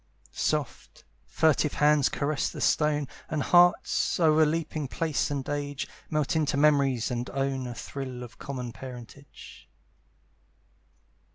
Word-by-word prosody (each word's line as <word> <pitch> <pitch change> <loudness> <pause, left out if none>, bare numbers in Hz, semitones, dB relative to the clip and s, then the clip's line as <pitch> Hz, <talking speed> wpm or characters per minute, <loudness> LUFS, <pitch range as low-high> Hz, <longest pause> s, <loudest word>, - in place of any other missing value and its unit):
Soft, - - -3 0.2
furtive 155 -1 +2
hands 150 -2 +4
caress 145 0 -1
the - - -8
stone, 150 -2 +1 0.2
And 155 -3 -1
hearts, 175 0 +3
o'erleaping 155 -1 +2
place 160 -1 -1
and 140 -2 -3
age, 145 -1 -3 0.2
Melt 155 +2 0
into 150 -3 +1
memories, 140 -5 +3
and 120 +1 -3
own 135 -1 -2
A 120 - -6
thrill 130 -1 -6
of 120 -1 -12
common 125 -3 -5
parentage. 130 +2 -12
145 Hz, 115 wpm, -27 LUFS, 130-155 Hz, 0.2 s, hands